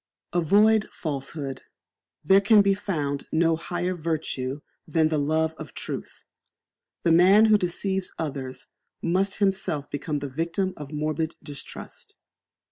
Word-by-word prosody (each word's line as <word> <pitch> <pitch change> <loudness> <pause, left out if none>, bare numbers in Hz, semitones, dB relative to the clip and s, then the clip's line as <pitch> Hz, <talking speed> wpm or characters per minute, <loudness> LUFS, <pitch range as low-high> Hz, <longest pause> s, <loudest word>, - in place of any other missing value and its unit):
Avoid 205 +6 +4
falsehood. 140 -2 -4 0.6
There 190 +5 +6
can 210 0 +6
be 200 0 +4
found 150 -8 -3
no 165 0 +3
higher 175 +2 -2
virtue 155 -5 -3 0.3
than 160 -2 +2
the 155 -1 +1
love 160 +2 +1
of 155 -4 -9
truth. - - -6 0.8
The 170 - +3
man 190 +6 +7
who 215 -1 +6
deceives 190 +1 -1
others 135 -4 -5 0.4
must 190 +3 +1
himself 190 -8 0
become 145 +1 -2
the 140 0 -4
victim 170 +7 -2
of 145 -2 -9
morbid 155 +1 -2
distrust. 145 -2 -9
165 Hz, 125 wpm, -25 LUFS, 150-190 Hz, 0.8 s, man